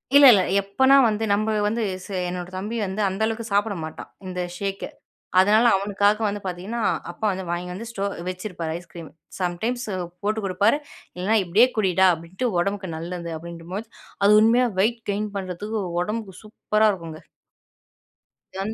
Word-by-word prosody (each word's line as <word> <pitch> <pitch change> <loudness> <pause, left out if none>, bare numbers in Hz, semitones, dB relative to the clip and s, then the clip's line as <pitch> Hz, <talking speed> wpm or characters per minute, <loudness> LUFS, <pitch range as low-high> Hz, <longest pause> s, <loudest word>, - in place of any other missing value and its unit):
இல்ல, 285 0 +9
இல்ல. 195 -3 +4 0.2
எப்போனா 230 +8 +4
வந்து 215 0 -1
நம்ம 215 +2 +1
வந்து 225 +3 0 0.2
ச - - -11 0.2
என்னோட 180 0 -5
தம்பி 210 +5 -4
வந்து 195 +2 -3
அந்த 190 +2 -3
அளவுக்கு 225 +1 -2
சாப்பட 205 +1 +2
மாட்டான், 155 - -8 0.2
இந்த 180 -1 -5 0.2
ஷேக்கு. 195 +1 -3 0.5
அதனால 210 +5 +5
அவனுக்காக 205 +2 +1
வந்து 205 0 -2
பாத்தீங்கன்னா, 190 +6 -4 0.3
அப்பா 220 - -5
வந்து 190 0 -4
வாங்கி 175 +1 -2
வந்து 220 +6 -7
ஸ்டோ 200 -3 -3 0.2
வச்சிருப்பாரு 180 -3 -5
ஐஸ்கிரீம். 170 -2 -11 0.3
சம்டைம்ஸ் 220 +8 -2 0.4
போட்டு 215 +2 0
குடுப்பாரு, 200 +7 +2 0.4
இல்லனா 195 +5 +1
இப்டியே 200 +8 +5
குடிடா 190 -2 +4
அப்டின்ட்டு. 170 +9 -4
உடம்புக்கு 200 +1 -2
நல்லது 170 +1 -5
அப்டின்றபோது 170 +6 -7 0.4
அது 205 - +6
உண்மையா 240 +3 +4
வெயிட் 230 +4 +2
கெயின் 210 +1 -2
பண்றத்துக்கு 200 +3 -4 0.2
உடம்புக்கு 210 0 -4
சூப்பரா 215 0 +1
இருக்குங்க. 165 -4 -8 1.3
தன் 195 +3 -3
200 Hz, 145 wpm, -24 LUFS, 180-215 Hz, 1.3 s, இல்ல